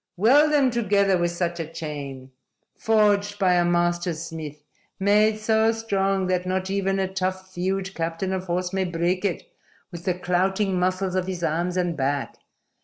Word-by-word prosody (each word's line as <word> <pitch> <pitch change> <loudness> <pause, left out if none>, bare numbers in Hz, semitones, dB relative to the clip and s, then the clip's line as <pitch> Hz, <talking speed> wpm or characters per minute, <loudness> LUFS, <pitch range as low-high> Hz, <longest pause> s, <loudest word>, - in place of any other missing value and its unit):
Weld 280 - +5
them 280 -4 +3
together 200 -4 +2
with 175 -1 +1
such 175 0 -2
a 165 - -3
chain, 140 -5 -7 0.4
forged 205 -2 +2
by 190 -3 +3
a 175 -1 +3
master 175 0 +1
smith, 155 -2 -7 0.4
made 210 +2 +3
so 220 +1 +2
strong 195 -4 0
that 180 0 -1
not 190 +1 -1
even 195 0 0
a 190 -1 0
tough 185 0 -3
thewed 190 +2 -2
captain 165 +3 -2
of 185 0 -3
horse 180 +1 -2
may 190 0 +1
break 175 +1 -1
it 190 -5 -3 0.4
with 170 -1 -9
the 180 -2 +1
clouting 185 +2 0
muscles 185 +1 0
of 185 0 -1
his 180 -2 -4
arms 170 +3 -1
and 175 -2 0
back. 140 0 -2
185 Hz, 170 wpm, -24 LUFS, 175-195 Hz, 0.4 s, Weld